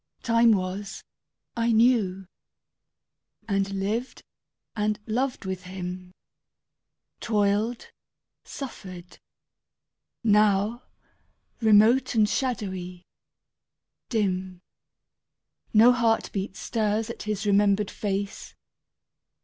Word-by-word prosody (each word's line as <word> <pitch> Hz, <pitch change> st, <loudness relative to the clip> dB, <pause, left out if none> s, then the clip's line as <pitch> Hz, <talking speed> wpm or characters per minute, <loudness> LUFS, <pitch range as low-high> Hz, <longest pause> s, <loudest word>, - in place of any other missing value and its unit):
Time 230 Hz, 0 st, +4 dB
was 195 Hz, +1 st, -4 dB, 0.5 s
I 235 Hz, 0 st, +1 dB
knew, 220 Hz, -5 st, +2 dB, 1.2 s
and 195 Hz, -2 st, 0 dB
lived 205 Hz, +6 st, -3 dB, 0.5 s
and 210 Hz, -1 st, 0 dB
loved 250 Hz, +1 st, -2 dB
with 185 Hz, -1 st, -5 dB
him; 180 Hz, 0 st, -7 dB, 1.1 s
Toiled, 210 Hz, +2 st, 0 dB, 0.5 s
suffered. 185 Hz, -9 st, -9 dB, 1.0 s
Now, 210 Hz, +1 st, +3 dB, 0.8 s
remote 225 Hz, +4 st, +4 dB
and 215 Hz, -2 st, +4 dB
shadowy, 195 Hz, -7 st, -3 dB, 1.0 s
dim, 185 Hz, -5 st, -2 dB, 1.1 s
No 225 Hz, +3 st, +7 dB
heartbeat 225 Hz, -5 st, 0 dB
stirs 220 Hz, 0 st, -1 dB
at -, -, -10 dB
his 215 Hz, 0 st, -3 dB
remembered 205 Hz, 0 st, +2 dB
face. 200 Hz, -1 st, -4 dB
210 Hz, 75 wpm, -26 LUFS, 195-230 Hz, 1.2 s, No